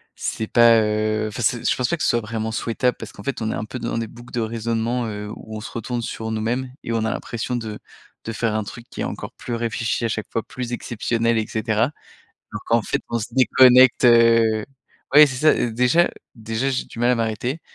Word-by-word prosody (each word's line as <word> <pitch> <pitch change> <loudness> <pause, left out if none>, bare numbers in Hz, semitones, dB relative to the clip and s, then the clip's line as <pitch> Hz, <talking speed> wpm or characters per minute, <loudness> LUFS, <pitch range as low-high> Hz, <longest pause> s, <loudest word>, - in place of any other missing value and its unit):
c'est 110 - -3
pas, 115 0 +6
heu, 110 0 0
enfin, 105 - -6
c'est 120 +1 +1
je - - +2
pense 125 -2 0
pas 170 - 0
que - - -3
ce - - +3
soit 120 - +2
vraiment 110 0 -4
souhaitable 120 +2 0
parce - - -8
qu'en - - -11
fait, 140 -3 -3
on 110 0 -1
est - - -2
un 105 - -4
peu 125 +3 -7
dans 115 0 -3
des 115 -1 -2
boucles 120 +2 -14
de 120 - -1
raisonnement, 115 +1 -1
heu, 105 -1 -5
où 110 0 -9
on - - -7
se - - -8
retourne 120 +1 -3
sur 110 -1 -5
nous-mêmes 120 +4 -2
et - - -4
on 110 -1 0
a 110 - 0
l'impression 120 +2 -4
de 110 -3 -5 0.5
de 115 - -4
faire 115 -1 -1
un 110 - 0
truc 115 +3 -9
qui - - -11
est - - 0
encore - - -6
plus 120 - -7
réfléchi 115 0 -2
à 115 - +1
chaque 110 -1 -3
fois, 115 - -2
plus 125 -1 -6
exceptionnel 115 0 -1
et 110 - -1
cetera 110 +3 0 0.6
donc, - - -6
en 115 0 +5
fait, - - -2
on 115 - 0
se 105 - -3
déconnecte, 130 -1 +6
heu 115 -2 +5 0.5
ouais, 150 0 +10
c'est 135 -2 -5
ça, 155 +4 +5
heu, 120 - 0
déjà 125 +9 +3 0.2
déjà 115 +3 -2
j'ai 130 - -1
du - - -12
mal 120 +1 +3
à 125 - +4
m'arrêter 115 +6 -2
115 Hz, 240 wpm, -22 LUFS, 110-125 Hz, 0.6 s, ouais